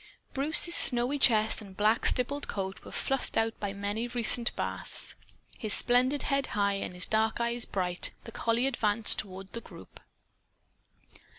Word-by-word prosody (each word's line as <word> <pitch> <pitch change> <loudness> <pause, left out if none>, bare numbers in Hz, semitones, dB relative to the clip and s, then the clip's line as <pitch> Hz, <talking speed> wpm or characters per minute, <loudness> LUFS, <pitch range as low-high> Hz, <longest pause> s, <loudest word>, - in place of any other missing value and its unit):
Bruce's 310 +5 +4
snowy 250 +1 +6
chest 220 -3 +2
and 195 -2 -14
black 215 +2 +1
stippled 280 +3 -1
coat 190 -1 -6
were - - -13
fluffed 270 -1 -4
out 225 0 0
by 205 -1 -5
many 205 +4 -5
recent 240 0 +1
baths. - - -4 0.5
His 215 -2 +3
splendid 255 +3 +1
head 275 -1 -1
high 200 -1 0
and 180 - -7
his 180 - -4
dark 220 +1 -2
eyes 235 0 0
bright, 180 -2 -4
the 230 - -11
collie 230 +2 -2
advanced 225 -5 +2
toward 190 -1 -9
the 230 - -7
group. - - -16
230 Hz, 155 wpm, -27 LUFS, 205-245 Hz, 0.5 s, snowy